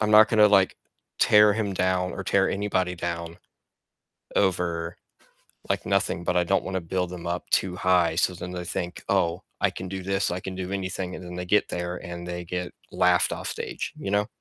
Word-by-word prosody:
I'm 105 -1 +1
not 110 0 +8
gonna, 105 -2 +6
like, 95 -2 +4 0.4
tear 105 0 +6
him 105 -2 -1
down 90 0 +1
or 95 - -5
tear 95 +1 +3
anybody 95 -3 0
down 85 -1 -4 1.0
over, 85 -3 0 0.7
like, - - 0
nothing, 85 - 0
but 90 0 +1
I 90 - +4
don't 95 +2 +1
wanna 95 -1 -2
build 90 +1 -2
them 90 -1 -7
up 90 +1 -3
too 95 -1 +1
high, 90 -3 +3
so 90 - +2
then 90 0 -7
they 90 -1 -5
think, 90 0 -4
"Oh, 85 +1 +1 0.2
I - - +4
can 95 - -6
do 95 -1 -5
this, 95 -1 0
I 90 - -2
can 95 0 -6
do 95 0 -4
anything," 95 -1 -3
and 90 - -8
then 90 0 -8
they 90 0 -4
get 105 +3 +2
there 90 0 -3
and 85 0 -7
they 90 0 -4
get 90 +1 -4 0.2
laughed - - +3
off - - -5
stage, - - -4
you 100 - -4
know? 105 +1 +2
90 Hz, 205 wpm, -26 LUFS, 90-95 Hz, 1.0 s, not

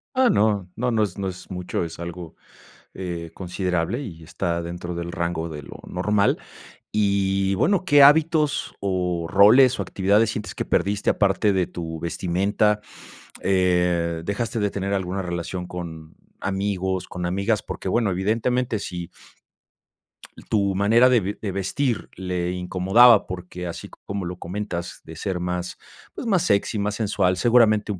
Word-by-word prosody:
Ah, 255 -1 +4
no. 100 -3 +2
No 125 +2 -1
no 110 -2 +2
es 95 -2 -3
no 100 -1 -2
es 95 +2 -8
mucho, 90 -1 -3
es 85 0 -7
algo, 85 -1 -7 0.6
eh, 85 -3 -5
considerable 90 +3 -2
y 85 -9 -9
está 85 +1 -2
dentro 85 +1 -5
del 85 0 -5
rango 85 -1 -2
de 75 -2 -7
lo - - -11
normal. 100 +3 +1 0.5
Y, 100 -2 +1
bueno, 190 - +2
¿qué 145 -6 +7
hábitos 150 0 +4
o 90 -3 -1
roles, 115 +8 +6
o - - +1
actividades 100 +3 +2
sientes 105 -2 -5
que - - -3
perdiste 100 0 0
aparte 100 0 +2
de 95 -2 +1
tu 80 -2 -6
vestimenta?, 100 +5 0 0.6
eh, 90 -3 +1
¿dejaste 110 +3 -2
de 105 -1 0
tener 100 0 -3
alguna 95 0 -2
relación 90 0 -4
con 80 -3 -8 0.3
amigos, 95 -2 -2
con 90 -1 -5
amigas? 100 +4 0
Porque, - - -6
bueno, 110 +1 +1
evidentemente, 115 +5 0
si 90 -3 -6 1.4
Tu 100 -2 +2
manera 115 +6 +5
de 125 - +5
ve 100 +1 -4
de 100 - -2
vestir 100 +6 -1
le 90 -1 -2
incomodaba 95 +6 +5
porque, 90 -1 -6
así 85 - -7
como 100 -2 -6
lo 90 +1 -5
comentas, 90 -2 -5
de 80 - -11
ser 95 +1 -3
más, 90 0 -3 0.4
pues, - - -6
más 190 -6 +2
sexy, 100 +2 +1
más 105 +1 -1
sensual, 100 -4 +1
seguramente 110 -1 +4
un 95 - -4
95 Hz, 155 wpm, -23 LUFS, 90-105 Hz, 1.4 s, qué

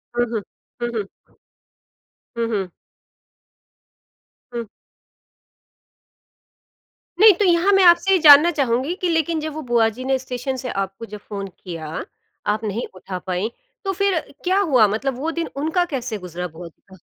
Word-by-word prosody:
हुँ, 240 0 +2
हुँ। 220 - -1 0.4
हुँ, 240 - -1
हुँ। 210 -3 -2 1.3
हुँ, 230 -1 -1
हुँ। 195 -4 -1 1.8
हुँ। 235 -2 -4 2.5
नहीं 430 0 +9
तो 410 - +2
यहाँ 350 +3 +4
मैं 390 -1 +5
आपसे 350 +2 +6
ये 380 - +6
जानना 300 +1 +9
चाहूँगी 265 +3 +1
कि 360 - +1
लेकिन 325 0 +1
जब 310 0 -4
वो 310 - -5
बुआ 230 -2 +4
जी 235 +4 -9
ने 265 0 +2
स्टेशन 260 +1 -4
से 250 0 -5
आपको 195 +2 -4
जब 210 -1 -9
फ़ोन 200 -1 -6 0.2
किया 165 -4 -6 0.6
आप 210 +1 0
नहीं 220 +3 -2
उठा 185 0 -6
पाईं, 185 +4 -2 0.3
तो 390 - -1
फिर 395 -2 +1 0.2
क्या 375 +2 +2
हुआ? 260 - +4
मतलब 240 +6 -2
वो 315 +4 -1
दिन 335 0 -3
उनका 320 +5 +1
कैसे 255 -7 -4
गुज़रा, 180 -1 -6
बुआ 170 +1 -10
का? 190 +3 -20
250 Hz, 155 wpm, -21 LUFS, 205-330 Hz, 2.5 s, नहीं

